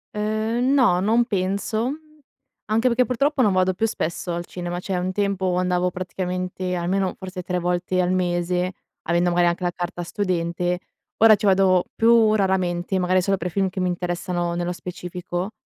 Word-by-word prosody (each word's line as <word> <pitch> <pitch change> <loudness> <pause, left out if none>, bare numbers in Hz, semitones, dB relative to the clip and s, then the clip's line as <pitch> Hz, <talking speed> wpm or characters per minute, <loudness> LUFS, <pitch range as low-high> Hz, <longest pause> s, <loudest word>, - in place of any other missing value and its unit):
Ehm, 220 +5 0
no, 230 -10 +4
non 225 +5 +3
penso, 200 +4 -1 0.7
anche 225 +4 +1
perché 250 +1 +3
purtroppo, 275 +3 +1
non 210 - +4
vado 185 0 +2
più 225 +4 0
spesso 175 -2 -3
al 170 0 -4
cinema, 175 0 -5
cioè, 190 0 -3
un 185 +1 -1
tempo 190 -2 0
andavo 180 0 +1
praticamente 180 0 -3
almeno, 185 +2 -1
forse 185 -1 -7
3 180 0 -2
volte 180 +1 -1
al 180 0 +2
mese 180 0 0 0.3
avendo 175 +1 +2
magari 175 0 +3
anche 170 +1 -1
la 175 - +1
carta 175 0 -5
studente, 175 -2 -1 0.4
ora 220 -1 +7
ci 205 - -1
vado 190 -2 +4
più 225 -1 +5
raramente 185 -2 0
magari 185 +1 +2
solo 195 0 +1
per 180 +1 -3
film 190 +2 0
che 185 - -6
mi 180 - +1
interessano 175 0 -2
nello 175 +1 -2
specifico; 180 +1 -5
185 Hz, 170 wpm, -23 LUFS, 175-200 Hz, 0.7 s, ora